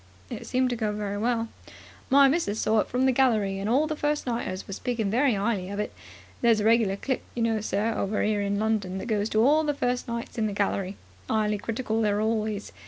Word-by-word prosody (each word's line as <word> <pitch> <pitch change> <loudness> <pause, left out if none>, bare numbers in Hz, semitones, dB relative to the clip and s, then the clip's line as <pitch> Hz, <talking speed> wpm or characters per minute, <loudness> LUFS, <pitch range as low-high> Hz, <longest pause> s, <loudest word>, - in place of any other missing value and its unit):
"It - - -6
seemed 255 0 +1
to - - 0
go 220 -2 -1
very 205 -1 -3
well." 230 0 0 0.6
"My 275 +1 +7
Missus 265 -8 0
saw 215 0 +2
it - - 0
from 255 +2 0
the 265 - +4
gallery, 220 -7 +2
and 200 +2 -2
all 270 +6 +3
the 310 0 -2
first 295 0 -1
nighters 230 -6 -3
was 195 - -6
speaking 230 -5 -2
very 255 +3 +3
'ighly 200 -2 -1
of 200 - -4
it. 210 - -3 0.5
There's 230 -2 +4
a 210 - -1
regular 225 -3 +4
click, 260 +6 -2
you 235 - 0
know, 225 -2 +1
sir, 215 +2 0
over 200 +2 -1
here 210 -1 +1
in 200 0 -1
London, 210 -3 -1
that - - -5
goes 215 -2 0
to 215 +1 +3
all 305 +3 +4
the 295 -1 0
first 250 -1 -1
nights 235 0 -5
in 215 - +1
the 205 - -3
gallery. 195 -1 -1 0.3
'Ighly 210 -1 +1
critical 225 +1 -2
they 215 - +2
are 205 0 +1
always. 215 -1 -1
220 Hz, 235 wpm, -26 LUFS, 205-245 Hz, 0.6 s, My